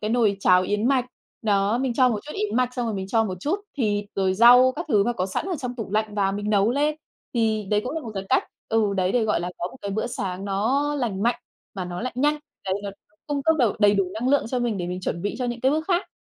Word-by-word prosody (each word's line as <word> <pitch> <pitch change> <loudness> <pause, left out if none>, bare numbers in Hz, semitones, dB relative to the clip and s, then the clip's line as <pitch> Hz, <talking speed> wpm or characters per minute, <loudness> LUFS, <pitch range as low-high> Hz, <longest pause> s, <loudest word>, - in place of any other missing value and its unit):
cái 215 +1 -2
nồi 225 -5 +2
cháo 185 -1 +5
yến 210 +4 0
mạch. 260 -2 +2 0.4
Đó, 205 +1 +2
mình 260 -2 -1
cho 255 +1 +5
một 220 -3 -1
chút 300 - -6
yến 415 - -2
mạch, 250 0 +1
xong 245 -2 -2
rồi 220 - -2
mình 190 -1 -4
cho 225 0 +2
một 185 -3 -4
chút 370 - -1 0.2
thịt, 205 -5 0
rồi 190 -1 +1
rau 245 +4 +7
các 340 - -4
thứ 205 -7 +3
mà 240 - +1
có 185 -4 -2
sẵn 195 - -3
ở 365 -4 -2
trong 250 -3 -5
tủ 225 -4 -5
lạnh 215 0 -1
và 195 -1 +1
mình 205 +1 -3
nấu 205 +1 +3
lên. 295 +3 +1 0.4
Thì 220 -3 +1
đấy 210 0 +3
cũng 255 - -3
là 325 - -2
một 225 - -6
cái 195 0 -4
cách 265 - +3 0.2
ừ, 215 -3 +1
đấy 185 0 +1
để 235 -3 +2
gọi 210 -5 +1
là 175 - -3
có 175 - -2
một 260 - -13
cái 200 - -3
bữa 220 +4 -1
sáng 190 -5 -4
nó 215 +8 +1
lành 225 -8 -2
mạnh 240 +1 +1 0.3
mà 185 -2 -4
nó 175 0 -5
lại 255 - -3
nhanh. 295 +3 +2 0.3
Đấy 190 0 0
nó 200 - -4 0.4
cung 285 -2 -2
cấp 320 +2 +3
đầu 235 -6 +3
đầy 205 -1 +5
đủ 195 -1 +2
năng 240 +4 -1
lượng 285 -4 +3
cho 255 - -1
mình 235 -5 -1
để 175 - -3
mình 180 +1 -4
chuẩn 170 -1 -3
bị 205 - -2
cho 255 - -1
những 240 -1 -3
cái 265 - +3
bước 315 +1 0
khác. 360 0 +1
220 Hz, 290 wpm, -24 LUFS, 200-255 Hz, 0.4 s, rau